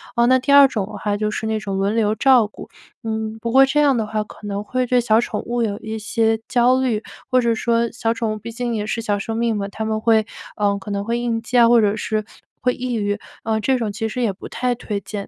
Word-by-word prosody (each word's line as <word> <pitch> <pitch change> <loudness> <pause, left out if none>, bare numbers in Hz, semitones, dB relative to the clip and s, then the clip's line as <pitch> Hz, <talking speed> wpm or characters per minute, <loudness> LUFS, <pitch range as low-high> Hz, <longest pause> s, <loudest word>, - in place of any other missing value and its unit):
哦 235 - +4
那 260 +1 +5
第 280 +2 +1
2 280 -1 +8
种 210 -7 -2
的 - - -11
话 205 -1 -1
就 215 0 -1
是 220 +1 -3
那 220 -1 -1
种 200 -2 -4
轮 200 +3 0
流 215 -1 +2
照 245 -2 +4
顾， - - -12 0.3
嗯， 220 0 -3
不 235 - -2
过 265 +2 +7
这 295 +2 +1
样 275 -4 +3
的 215 -2 -1
话 215 0 -2
可 210 -1 -12
能 200 0 -3
会 255 +4 -1
对 250 0 +3
小 225 -1 +3
宠 240 - -3
物 240 0 -1
有 205 -2 -2
一 220 0 -5
些 225 +1 +1
焦 250 +1 +3
虑。 230 -5 0 0.3
或 255 0 +3
者 235 -1 +2
说 235 0 0
小 230 -1 -1
宠 230 -1 -2
物 - - -5
毕 230 +2 -8
竟 240 0 -3
也 210 -1 -2
是 230 - -2
小 205 -2 -1
生 225 +2 -4
命 230 -2 0
嘛， 200 0 -3
它 220 +2 -6
们 220 0 -1
会， 220 -1 +3 0.3
呃， 205 -1 +1
可 205 - -8
能 200 0 -2
会 235 +2 -1
应 230 -2 -1
激 245 +2 -1
啊 235 -1 +7
或 235 -1 +5
者 210 +1 +1
是 215 0 -2 0.4
会 250 0 +2
抑 250 -1 -3
郁， 205 -1 -1 0.2
呃， 220 0 0
这 260 +4 +1
种 225 -4 -2
其 225 +2 -3
实 250 +3 -4
也 220 -4 +1
不 190 - -10
太 250 0 -1
推 210 -4 -4
荐。 200 0 -6
225 Hz, 285 characters per minute, -20 LUFS, 210-240 Hz, 0.4 s, 2